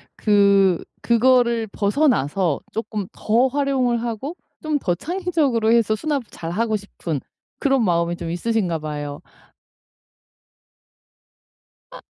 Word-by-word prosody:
그 200 -3 +4 0.2
그거를 235 -1 +3
벗어나서 200 - +1
쪼끔 215 -3 -4
더 235 +5 +2
활용을 260 -4 0
하고 240 +8 -4 0.3
좀 305 -2 -1
더 175 -7 0
창의적으로 300 - 0
해서 225 -2 +3
수납을 290 -1 -1
잘하고 215 +7 -2
싶은 170 -7 -5 0.4
그런 270 -4 +2
마음이 170 -2 +1
좀 170 -1 -6
있으신가 180 -3 -1
봐요. 145 -1 -5 2.7
아. - - -10
225 Hz, 230 characters per minute, -22 LUFS, 180-260 Hz, 2.7 s, 그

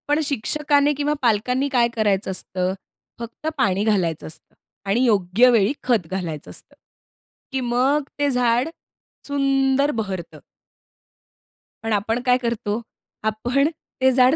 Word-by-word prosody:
पण 295 +1 +2
शिक्षकाने 290 +2 +1
किंवा 290 +1 0
पालकांनी 250 +4 +1
काय 245 -3 +3
करायचं 205 -3 +1
असतं? 185 0 -2 0.5
फक्त 235 +6 -7
पाणी 200 -5 +2
घालायचं 185 -7 0
असतं 155 - -12 0.3
आणि 220 +5 +2
योग्य 210 +2 +4
वेळी 225 +1 +3
खत 225 -10 +1
घालायचं 170 -6 -4
असतं. - - -12 0.8
की 265 - -1
मग 255 +5 +1 0.2
ते 290 0 +2
झाड 245 +2 +2 0.6
सुंदर 275 0 +2
बहरतं. 195 - -5 1.4
पण 225 -1 -1
आपण 225 +4 0
काय 250 0 +4
करतो? 235 -3 -2 0.4
आपण 245 +6 +1 0.3
ते 260 0 +5
झाड 255 +2 +5
240 Hz, 125 wpm, -22 LUFS, 205-270 Hz, 1.4 s, ते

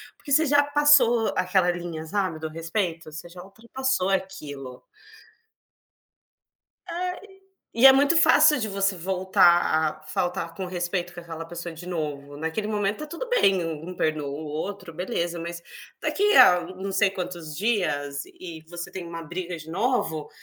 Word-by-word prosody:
porque 285 - -11
você 315 +3 +5
já 290 0 +4
passou 285 -6 +4
aquela 185 -1 +2
linha, 170 -2 -6
sabe, 185 -2 -2
do 160 - -4
respeito, 165 0 -3
você 155 +3 -8
já 180 +1 -11
ultrapassou 230 +1 -2
aquilo. 150 -10 -4 2.0
É, 345 0 -4 0.7
e 230 - -2
e - - +11
é 265 - +11
muito 285 +4 +4
fácil 315 -2 +6
de 220 - -2
você 195 -1 0
voltar 175 -3 +2
a - - -18
faltar 165 0 -2
com 190 +2 -5
respeito 175 0 -3
com 175 - -8
aquela 165 -1 -7
pessoa 170 0 -7
de 170 +2 -10
novo. 145 -5 -5
Naquele 160 +8 -3
momento 210 +5 -1
está - - -9
tudo 340 +11 -6
bem, 195 - +3
um 165 +2 -5
perdoa 155 -3 -1
o 145 +3 -6
outro, 165 +4 -5
beleza, 175 0 -3
mas 170 +1 -6 0.4
daqui 415 +1 +2
a 180 0 +8
na 180 +2 -9
não 195 +1 -5
sei 200 0 +3
quantos 175 -5 -6
dias 145 -9 -1
e 165 -3 -10
você 175 0 -7
tem 180 -2 -7
uma 165 0 -7
briga 175 +2 -5
de 160 0 -10
novo, 170 - -1
180 Hz, 165 wpm, -25 LUFS, 165-205 Hz, 2.0 s, e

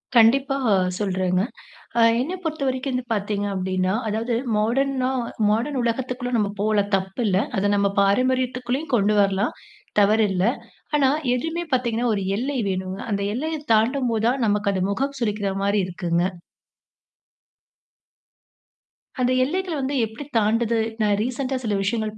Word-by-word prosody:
கண்டிப்பா, 265 +4 +5 0.4
சொல்றேங்க. 185 -2 0 0.6
அ - - +5 0.2
என்னை 310 +9 -2
பொறுத்த 315 -3 -3
வரைக்கும் 260 +1 -1
வந்து 250 0 -2
பாத்தீங்க 205 -1 -1
அப்டீன்னா, 185 0 0
அதாவது 225 +3 -1 0.2
மாடர்னா 255 +4 +1 0.4
மாடர்ன் 240 +7 0
உலகத்துக்குள்ள 245 +1 -2
நம்ப 210 -3 +1
போலாம் 205 -1 +1
தப்பு 190 +5 -4
இல்ல. 190 -2 +2 0.2
அத 200 +1 +2
நம்ப 200 0 +2
பாரம்பரியத்துக்குள்ளயும் 255 +6 0
கொண்டு 210 0 +2
வரலாம். 195 0 +1 0.5
தவறில்ல. 205 -3 +3 0.5
ஆனா, 275 -2 +4 0.3
எதுவுமே 325 +7 -2
பாத்தீங்கன்னா, 245 -1 +1
ஒரு 200 - -2
எல்லை 265 +5 -2
வேணுங்க. 185 0 -3
அந்த 200 -1 -1
எல்லையைத் 300 +3 -4
தாண்டும்போது 230 0 +1
தான், 255 +1 0
நமக்கு 205 -1 +1
அது 185 - 0
முகம் 275 +6 -2
சுளிக்கிற 210 -3 -1
மாதிரி 200 +1 +2
இருக்குங்க. 175 -1 -1 3.0
அந்த 250 0 +2
எல்லைகள் 350 +3 -2
வந்து 270 +2 -2
எப்படி 225 +6 -9
தாண்டுது? 225 +1 +2 0.2
நான் 205 -1 +2
ரீசெண்ட்டா 255 +2 -2
சில 215 -3 0
விஷயங்கள் 215 +1 -2
225 Hz, 130 wpm, -23 LUFS, 200-260 Hz, 3.0 s, கண்டிப்பா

